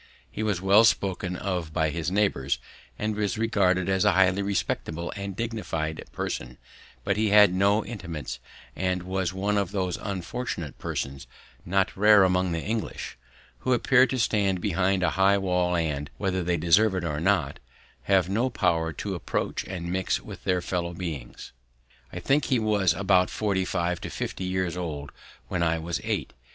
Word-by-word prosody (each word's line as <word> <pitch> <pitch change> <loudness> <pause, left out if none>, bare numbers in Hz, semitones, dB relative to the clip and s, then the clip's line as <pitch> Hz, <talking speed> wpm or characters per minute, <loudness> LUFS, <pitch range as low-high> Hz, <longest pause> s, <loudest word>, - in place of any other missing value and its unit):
He 105 - -5
was 105 -5 0
well 100 +3 +6
spoken 95 -4 +1
of 90 -5 -3
by 80 -1 +1
his 85 0 -2
neighbours, 90 -10 +1 0.4
and 105 0 -2
was 105 +1 -1
regarded 95 -5 +2
as 95 -1 +2
a - - +4
highly 95 +1 +3
respectable 85 -4 -2
and 100 -1 -5
dignified 90 -9 -3
person, - - -4 0.5
but 95 - 0
he 110 0 +2
had 105 -2 +7
no 100 +3 +2
intimates 85 - -6 0.4
and 90 -1 -1
was 95 -1 -1
one 100 +2 0
of 100 -3 -1
those 95 -3 -2
unfortunate 95 - -5
persons, 65 -2 -4 0.4
not 95 +1 +1
rare 105 0 +6
among 90 -1 +2
the 80 -1 -2
English, 110 +1 -4 0.4
who 130 - +1
appear 130 +2 +4
to 130 - -2
stand 100 -5 +1
behind 95 0 +1
a - - +2
high 100 +1 +5
wall 90 -2 +1
and, 75 -4 -1
whether 95 -2 -1
they 85 0 0
desire 95 +5 +4
it 90 - -2
or 75 -3 -2
not, 95 +4 +1 0.5
have 95 -2 +3
no 115 +7 +1
power 85 -8 +1
to 100 +4 -4
approach 85 - -2
and 85 -2 -5
mix 95 0 0
with - - -11
their 90 -1 +1
fellow 85 -1 -2
beings. 80 -9 -6 0.6
I - - -5
think 140 +2 +2
he 130 - +2
was 105 -4 +2
about 95 -2 +3
forty 100 -3 0
five 85 -1 -1
to - - -5
fifty 95 - -4
years 90 -2 -1
old 75 -5 -5 0.4
when 90 - -2
I 85 -1 +2
was 85 +1 -3
eight. - - -2
95 Hz, 170 wpm, -26 LUFS, 85-100 Hz, 0.6 s, had